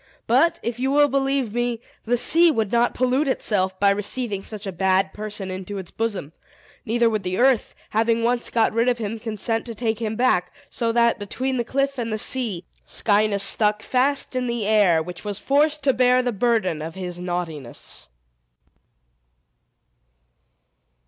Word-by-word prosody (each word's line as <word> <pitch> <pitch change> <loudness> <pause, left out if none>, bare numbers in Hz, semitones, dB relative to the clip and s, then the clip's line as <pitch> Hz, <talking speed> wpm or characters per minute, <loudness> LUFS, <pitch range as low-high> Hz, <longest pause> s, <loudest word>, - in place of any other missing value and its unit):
But 265 +9 +3
if 235 +1 -3
you 265 +1 0
will 290 +1 +4
believe 270 -4 0
me, 240 -1 -1 0.3
the 245 +2 +1
sea 335 +7 +5
would 220 -9 0
not 240 0 +2
pollute 255 +4 +1
itself 190 -7 0
by 200 0 +4
receiving 210 +1 -2
such 215 +1 -8
a 195 - -3
bad 190 +1 +1
person 210 -2 -5
into 190 +2 -6
its 190 -3 -7
bosom; 200 -9 -3 0.5
neither 235 +1 +2
would 215 -2 0
the 185 0 -3
earth, 255 -2 +2 0.2
having 225 +1 +1
once 240 +1 +1
got 225 -2 +1
rid 230 +2 +2
of 245 - 0
him, 225 0 -4
consent 225 0 -1
to 230 - -6
take 220 -1 -2
him 220 -1 -3
back; 215 -7 +1 0.2
so 230 -2 0
that, 235 -1 +2
between 255 +6 -3
the 240 - 0
cliff 275 +2 -1
and 230 -1 -3
the 215 - -1
sea, 215 -6 -1 0.2
Scinis 205 -2 +1
stuck 210 +1 +2
fast 270 +1 0
in 250 -1 -1
the 235 -3 -2
air, 200 -7 +3
which 180 +1 -9
was 205 -2 -4
forced 295 +5 +1
to 270 -1 +3
bear 250 0 +3
the 245 - 0
burden 205 -7 0
of 160 +2 -6
his 180 -2 -6
naughtiness. 170 - -6
225 Hz, 170 wpm, -23 LUFS, 200-250 Hz, 0.5 s, sea